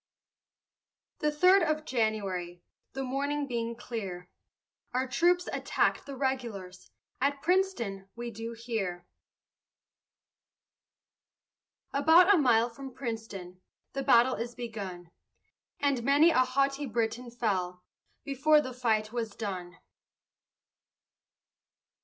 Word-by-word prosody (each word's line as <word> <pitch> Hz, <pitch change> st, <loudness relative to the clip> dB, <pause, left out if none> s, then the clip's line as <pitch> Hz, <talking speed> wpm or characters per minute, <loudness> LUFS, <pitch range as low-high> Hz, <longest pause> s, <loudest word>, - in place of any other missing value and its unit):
The 300 Hz, -, +1 dB
third 365 Hz, +6 st, +5 dB
of 310 Hz, -2 st, 0 dB
January, 195 Hz, -, -2 dB, 0.3 s
The 270 Hz, -, -3 dB
morning 285 Hz, +3 st, -1 dB
being 235 Hz, -3 st, -3 dB
clear, 195 Hz, -7 st, -6 dB, 0.6 s
Our 260 Hz, +1 st, +1 dB
troops 350 Hz, +7 st, +2 dB
attack'd -, -, 0 dB
the 280 Hz, -, -6 dB
regulars, 235 Hz, -9 st, -4 dB, 0.3 s
At 280 Hz, +1 st, 0 dB
Princeton, 310 Hz, -, 0 dB
we 240 Hz, 0 st, -5 dB
do 225 Hz, +2 st, -6 dB
hear. 215 Hz, -7 st, -4 dB, 2.9 s
About 325 Hz, +7 st, +6 dB
a -, -, +5 dB
mile 235 Hz, -4 st, +4 dB
from 265 Hz, +1 st, -9 dB
Princeton, 210 Hz, -7 st, -6 dB, 0.3 s
The 275 Hz, -, -2 dB
battle 250 Hz, 0 st, +5 dB
is 235 Hz, +1 st, -4 dB
begun, 195 Hz, -8 st, -7 dB, 0.7 s
And 280 Hz, -4 st, +1 dB
many 285 Hz, +7 st, +5 dB
a 255 Hz, -, +3 dB
haughty 275 Hz, +2 st, +1 dB
Briton 235 Hz, +1 st, -2 dB
fell 185 Hz, -7 st, -2 dB, 0.4 s
Before 300 Hz, +2 st, +4 dB
the 260 Hz, -3 st, -4 dB
fight 220 Hz, -3 st, 0 dB
was 225 Hz, -4 st, -3 dB
done. 180 Hz, -4 st, -5 dB
240 Hz, 105 wpm, -30 LUFS, 215-275 Hz, 2.9 s, About